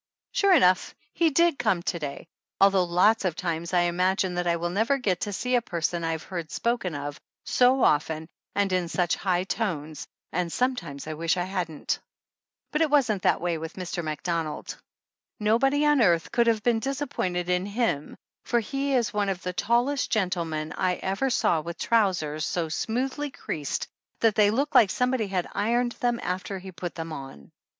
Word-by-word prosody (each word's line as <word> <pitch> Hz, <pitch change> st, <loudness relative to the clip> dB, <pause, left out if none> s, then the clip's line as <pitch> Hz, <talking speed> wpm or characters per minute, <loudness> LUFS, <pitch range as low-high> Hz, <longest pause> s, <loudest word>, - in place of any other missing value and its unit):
Sure 400 Hz, -1 st, +3 dB
enough 185 Hz, -, +3 dB, 0.2 s
he 335 Hz, -1 st, +3 dB
did 335 Hz, 0 st, +3 dB
come 210 Hz, -8 st, +1 dB
to 170 Hz, -, -2 dB
day, 145 Hz, -2 st, -5 dB, 0.3 s
although 195 Hz, -2 st, +5 dB
lots 185 Hz, +6 st, +3 dB
of 180 Hz, -4 st, 0 dB
times 170 Hz, -2 st, -3 dB
I 180 Hz, -1 st, +3 dB
imagine 180 Hz, +2 st, +1 dB
that 180 Hz, 0 st, -1 dB
I 170 Hz, -, +3 dB
never 190 Hz, +10 st, +1 dB
will -, -, -4 dB
get 190 Hz, -8 st, 0 dB
to 205 Hz, -, -3 dB
see 250 Hz, +6 st, -2 dB
a 245 Hz, -, +4 dB
person 170 Hz, -4 st, -2 dB
I -, -, 0 dB
ha 165 Hz, -, 0 dB
ir -, -, -1 dB
e -, -, -13 dB
heard 170 Hz, -4 st, -5 dB
spoken 235 Hz, -9 st, -1 dB
of 145 Hz, +2 st, -5 dB, 0.2 s
so 255 Hz, +1 st, +3 dB
often 155 Hz, +1 st, +2 dB, 0.3 s
and 200 Hz, -2 st, +1 dB
in 180 Hz, -2 st, 0 dB
such 175 Hz, 0 st, +1 dB
high 180 Hz, -2 st, 0 dB
tones 160 Hz, -8 st, -3 dB, 0.2 s
and 175 Hz, -2 st, -1 dB
sometimes 245 Hz, -, -2 dB
I 155 Hz, -, -4 dB
wish 165 Hz, +3 st, 0 dB
I 175 Hz, -, 0 dB
hadn't. 175 Hz, -5 st, -3 dB, 0.7 s
But 305 Hz, -, 0 dB
it 320 Hz, -, +3 dB
wasn't 245 Hz, -9 st, +2 dB
that -, -, +2 dB
way 170 Hz, -2 st, -1 dB
with 160 Hz, +1 st, -6 dB
Mr. 180 Hz, -2 st, -4 dB
Mac 155 Hz, -2 st, -4 dB
donald. 165 Hz, -3 st, -3 dB, 0.6 s
Nobody 270 Hz, +7 st, +3 dB
on 295 Hz, -3 st, +4 dB
earth 170 Hz, -6 st, +3 dB
could 235 Hz, -1 st, +2 dB
have 220 Hz, -2 st, +2 dB
been 235 Hz, -2 st, +2 dB
dis 270 Hz, +3 st, -3 dB
appointed 180 Hz, -11 st, -2 dB
in 180 Hz, +1 st, 0 dB
him 205 Hz, -, -1 dB, 0.3 s
for 240 Hz, -, +1 dB
he 275 Hz, +4 st, -1 dB
is 235 Hz, -4 st, +1 dB
one 205 Hz, -1 st, 0 dB
of 190 Hz, -1 st, -3 dB
the 180 Hz, -, -3 dB
tallest 245 Hz, +8 st, +1 dB
gentlemen 170 Hz, -7 st, -1 dB
I 185 Hz, -1 st, +1 dB
ever 195 Hz, +10 st, -1 dB
saw 170 Hz, -9 st, +2 dB
with 170 Hz, +2 st, -7 dB
trousers 180 Hz, -9 st, +1 dB
so 165 Hz, 0 st, -1 dB
smoothly 260 Hz, -, -2 dB
creased 150 Hz, -, -4 dB, 0.3 s
that 225 Hz, -2 st, +4 dB
they 205 Hz, 0 st, +4 dB
look 275 Hz, +7 st, 0 dB
like 215 Hz, -, +6 dB
somebody 250 Hz, -1 st, 0 dB
had 185 Hz, -2 st, -1 dB
ironed 240 Hz, +4 st, +1 dB
them 240 Hz, -1 st, +1 dB
after 185 Hz, +2 st, -3 dB
he 190 Hz, 0 st, -9 dB
put 175 Hz, 0 st, -6 dB
them 165 Hz, -1 st, -5 dB
on. 135 Hz, -, -9 dB
185 Hz, 195 wpm, -26 LUFS, 170-235 Hz, 0.7 s, like